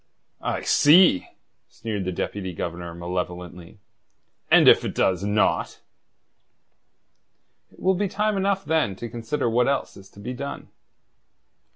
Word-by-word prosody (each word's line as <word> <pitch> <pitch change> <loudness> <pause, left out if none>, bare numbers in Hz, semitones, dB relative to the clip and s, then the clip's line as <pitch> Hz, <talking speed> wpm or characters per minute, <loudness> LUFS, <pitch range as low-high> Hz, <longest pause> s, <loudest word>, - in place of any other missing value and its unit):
"I - - -2
see!" 155 - +5 0.4
sneered 110 -5 -5
the 95 - -2
Deputy 95 +1 -4
Governor 85 +1 -6
malevolently. 90 +1 -6 0.7
"And - - +6
if - - +7
it - - -4
does 95 0 +1
not?" 105 +1 0 1.9
"It - - -21
will 190 - +2
be 200 +2 -1
time 210 +2 -1
enough 195 0 0
then 155 -11 0
to 120 - -7
consider 120 +3 -3
what 120 +2 +2
else 140 - -1
is 95 0 -14
to - - -17
be 115 +5 -5
done." 140 +3 -7
110 Hz, 135 wpm, -24 LUFS, 90-150 Hz, 1.9 s, if